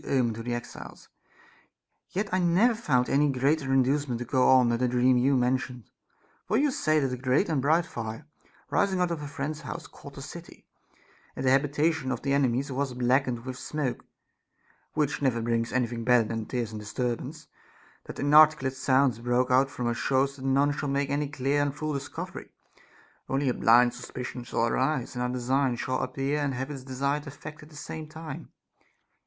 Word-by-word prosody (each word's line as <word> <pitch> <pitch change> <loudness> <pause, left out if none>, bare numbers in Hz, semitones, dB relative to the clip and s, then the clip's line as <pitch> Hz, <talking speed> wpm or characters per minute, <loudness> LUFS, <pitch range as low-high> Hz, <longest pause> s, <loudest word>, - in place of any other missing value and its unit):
omen 125 -4 +1
to 115 - -7
the 120 +1 -2
exiles, 120 0 -9 1.0
yet 200 +3 -2
I 185 - +3
never 185 +7 +4
found 135 - +1
any 145 +1 +3
greater 135 +2 +1
induce 135 +2 +2
ment 120 -2 -2
to 120 - -5
go 130 +1 +3
on 130 -2 +6
than 120 0 0
the 125 - +2
dream 125 +1 +3
you 130 +2 +3
mentioned; 125 -1 -1 0.6
for 215 - +2
you 285 +2 +3
say 155 - +2
that 135 -3 -1
a - - -3
great 130 +9 +1
and 150 -5 +1
bright 160 +5 +3
fire, 115 +1 -6 0.5
rising 195 -2 +2
out 180 -1 +1
of 165 -3 -3
a 145 - -5
friend's 145 +2 -4
house, - - -6
caught - - -13
the - - -8
city, - - -11 0.7
and 135 - -4
that - - +4
the - - +4
habitation 145 +1 +1
of 125 - -4
the 140 0 +1
enemies 135 0 +1
was 135 -1 -2
blackened 125 -1 +1
with 130 -1 -6
smoke, 145 -5 -3 0.9
which 150 -1 0
never 130 -4 +1
brings 115 0 -1
any 125 -1 +2
thing 115 0 -5
better 120 -2 +4
than 115 -1 -4
tears 120 -3 -3
and 110 - -6
disturbance; 125 +7 -4 0.6
that - - -9
inarticulate 150 -2 +5
sounds 130 -2 +2
broke 125 +2 +1
out 130 +2 +4
from 125 -3 -5
us 120 0 0
shows 135 +3 +1
that 130 - -11
none 140 +2 +3
shall 145 0 -3
make 140 0 0
any 145 +1 0
clear 140 0 0
and 145 -1 -1
full 155 0 -3
discovery; 140 -1 -6 0.8
only 135 0 +1
a - - +1
blind 120 +1 +5
suspicion 125 0 -7
shall 115 -1 0
arise, 130 +2 0
and 125 - -4
our 125 - 0
design 125 +1 0
shall 130 +2 -2
appear 135 +3 -1
and 140 -2 -1
have 130 +3 -4
its 135 -2 -6
desired 140 +3 -2
effect 150 +2 -9
at 150 - -14
the 155 - -16
same 155 +1 -7
time. 160 0 -8
135 Hz, 195 wpm, -27 LUFS, 125-145 Hz, 1.0 s, on